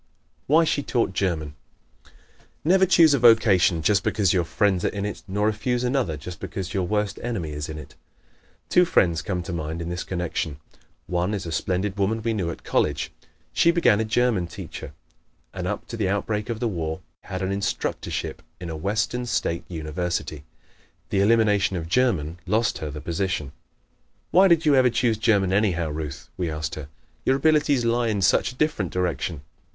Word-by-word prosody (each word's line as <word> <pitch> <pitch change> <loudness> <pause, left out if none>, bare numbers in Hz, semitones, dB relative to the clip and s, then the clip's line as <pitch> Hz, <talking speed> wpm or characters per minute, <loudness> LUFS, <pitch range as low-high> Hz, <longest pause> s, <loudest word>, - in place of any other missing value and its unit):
Why 160 +4 +5
She 150 -2 +1
Taught 120 -7 0
German 85 -6 -1 0.5
¶ - - -21 0.6
Never 190 +3 +5
choose 165 -4 +6
a 140 - +2
vocation 105 -8 +5
just 100 +4 +3
because 100 -5 +1
your 90 -2 +2
friends 95 +1 +1
are - - +2
in 100 -1 -3
it, 105 - -5
nor 100 +2 0
refuse 120 +3 0
another 125 - 0
just 85 +3 -8
because 95 -1 -5
your 95 -3 0
worst 105 0 -1
enemy 105 -10 -3
is 75 +1 -5
in 80 - -5
it. 75 - -10 0.7
Two 180 - +5
friends 85 - +2
come 90 -2 -3
to 95 - -5
mind 80 0 -4
in 85 0 -4
this 90 +1 -3
connection. 85 -4 -3 0.5
One 90 +4 -1
is 95 -2 -5
a 85 - -5
splendid 95 +5 -1
woman 110 +3 0
we 115 0 0
knew 95 -6 -1
at 85 - -7
college. 75 -1 0 0.4
She 170 - +4
became 170 -11 +4
a - - +2
German 110 -4 +1
teacher 75 - -8 0.6
and 90 -1 -4
up 105 - -3
to 115 - -5
the 100 -4 0
outbreak 105 +2 -1
of 115 -2 -3
the 120 - 0
War 80 -6 -3 0.2
had 95 0 -4
an 95 - -1
instructorship 100 -1 -3 0.2
in 85 -2 -6
a - - -4
western 110 +8 -1
state 85 -6 -1
university. 80 -2 -3 0.7
The 100 - +2
elimination 105 -3 +3
of 80 -2 -4
German 90 - +1
lost 110 +4 +1
her 75 - -4
the 75 +1 -7
position. 85 -5 -2 0.8
"Why 190 +2 +6
did 170 -3 +3
you 150 - +5
ever 130 -2 +5
choose 115 -2 +1
German, 100 -5 +2
anyhow, 90 -6 +1
Ruth?" 75 -2 -6
we 90 -3 -1
asked 75 +1 -4
her. 75 -3 -7 0.3
"Your 130 - +3
abilities 145 -3 +3
lie 120 0 +2
in 105 -3 0
such 95 - +3
a - - -14
different 130 - 0
direction." 85 -3 -2
95 Hz, 185 wpm, -24 LUFS, 85-115 Hz, 0.8 s, choose